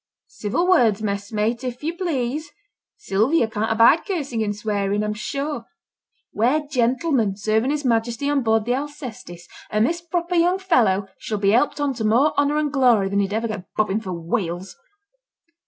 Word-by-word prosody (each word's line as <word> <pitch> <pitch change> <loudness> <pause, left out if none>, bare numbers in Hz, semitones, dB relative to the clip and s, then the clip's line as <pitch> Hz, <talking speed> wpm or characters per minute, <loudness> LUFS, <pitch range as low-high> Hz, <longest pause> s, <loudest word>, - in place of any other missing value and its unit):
'Civil 220 - -2
words, 230 - +3
messmate, 210 +4 -2
if 250 +1 -5
you 330 +3 -2
please. 300 -4 -2 0.5
Sylvia 235 - +1
can't 220 0 -2
abide 230 +8 +5
cursing 285 - -3
and 205 -1 -1
swearing, 205 -1 -1
I'm 210 0 -1
sure. 275 +3 -4 0.7
We're 265 +8 +1
gentlemen 250 - +1
serving 220 +4 0
his 295 -1 -2
Majesty 235 +2 0
on 290 -1 +2
board 220 -2 +1
the 245 - +1
Alcestis, 250 - -6 0.3
and 215 +1 +2
this 340 +5 -1
proper 345 +1 -3
young 350 +2 +3
fellow 235 - +2
shall 215 - -3
be 200 0 +2
helped 245 +7 +2
on 290 -2 0
to 230 - -5
more 240 +8 +3
honour 285 +1 +2
and 300 -1 -1
glory 240 -8 +3
than 200 +1 0
he'd 200 0 0
ever 225 +2 -1
get 195 -4 -7
bobbing 215 -1 +1
for 190 -4 -6
whales. 175 +1 -3
235 Hz, 170 wpm, -22 LUFS, 210-290 Hz, 0.7 s, abide